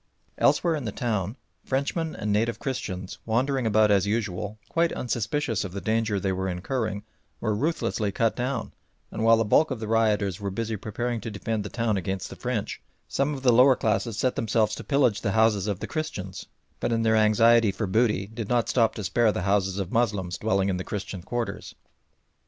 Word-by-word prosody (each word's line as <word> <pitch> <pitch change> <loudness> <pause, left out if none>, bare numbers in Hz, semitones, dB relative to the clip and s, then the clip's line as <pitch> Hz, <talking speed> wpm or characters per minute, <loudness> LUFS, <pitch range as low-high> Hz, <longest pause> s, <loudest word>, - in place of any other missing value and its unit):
Elsewhere 170 -2 +3
in 150 -5 -3
the 110 - -2
town 105 -2 -2 0.3
Frenchmen 150 +4 -1
and 105 -1 -1
native 115 +3 +1
Christians, 95 -8 -4
wandering 125 +2 0
about 110 -1 +4
as 100 -1 +3
usual, 105 -1 -2
quite 170 0 +1
unsuspicious 120 0 -1
of 95 -3 -6
the 100 - -3
danger 110 -1 0
they 95 0 -1
were 95 0 -2
incurring, 100 +3 -2 0.4
were 110 -2 0
ruthlessly 110 -5 -1
cut 115 +3 +1
down, 125 +3 -3 0.4
and 110 - -3
while 115 0 +6
the 115 - +1
bulk 155 +9 +4
of 130 -4 -3
the 110 - -5
rioters 105 -4 +1
were 100 -1 -3
busy 110 +3 -3
preparing 115 +3 -3
to 115 - -5
defend 105 +1 -3
the 105 - -6
town 115 -3 0
against 95 0 -3
the - - -7
French, 120 -5 -3 0.3
some 140 +2 0
of 135 - -8
the 125 -2 +5
lower 130 +3 +7
classes 110 -1 -1
set 130 +2 +1
themselves 110 -1 +1
to - - -5
pillage 125 -6 +2
the 100 - -1
houses 110 -3 +3
of 100 -3 -2
the - - -2
Christians, 100 - -5 0.3
but - - -1
in 115 -1 +1
their 110 -1 +3
anxiety 110 0 +5
for 95 +3 -3
booty 105 0 +1
did 110 0 -6
not 120 -2 +2
stop 115 -3 +2
to 105 - -5
spare 110 +4 +2
the 95 - -3
houses 95 -1 +1
of 95 -2 -3
Moslems 100 -6 0
dwelling 100 -3 +1
in 95 - 0
the 90 - -4
Christian 100 -2 -5
quarters. 120 +6 -4
110 Hz, 200 wpm, -26 LUFS, 100-120 Hz, 0.4 s, lower